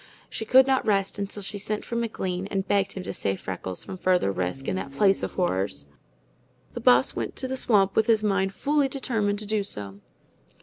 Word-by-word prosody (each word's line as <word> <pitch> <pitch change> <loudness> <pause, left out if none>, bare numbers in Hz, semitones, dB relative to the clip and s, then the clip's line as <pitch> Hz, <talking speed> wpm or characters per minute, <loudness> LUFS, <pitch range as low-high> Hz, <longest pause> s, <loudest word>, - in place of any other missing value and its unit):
She 220 - -4
could 260 +3 +6
not 265 -1 +2
rest 195 -1 0
until 200 0 -5
she 205 +1 -4
sent 210 +1 -3
for 235 - -5
McLean 195 -5 -2
and 195 -1 -2
begged 200 -1 +1
him 190 - -6
to - - -5
save 95 -1 -2
Freckles 95 -1 -6
from 185 - -8
further 180 - +2
risk, 95 +8 -3
in - - 0
that 140 - -5
place 195 +7 +3
of - - -4
horrors. 95 - -1 0.9
The - - -5
Boss 125 +1 +5
went 115 -2 -4
to 260 - -4
the 260 - -3
swamp 200 -6 +3
with 220 - +3
his 220 -2 +3
mind 195 -2 +1
fully 285 +7 +1
determined 225 -7 -1
to 210 - -5
do 210 0 0
so. 100 - -5
195 Hz, 210 wpm, -26 LUFS, 135-215 Hz, 0.9 s, could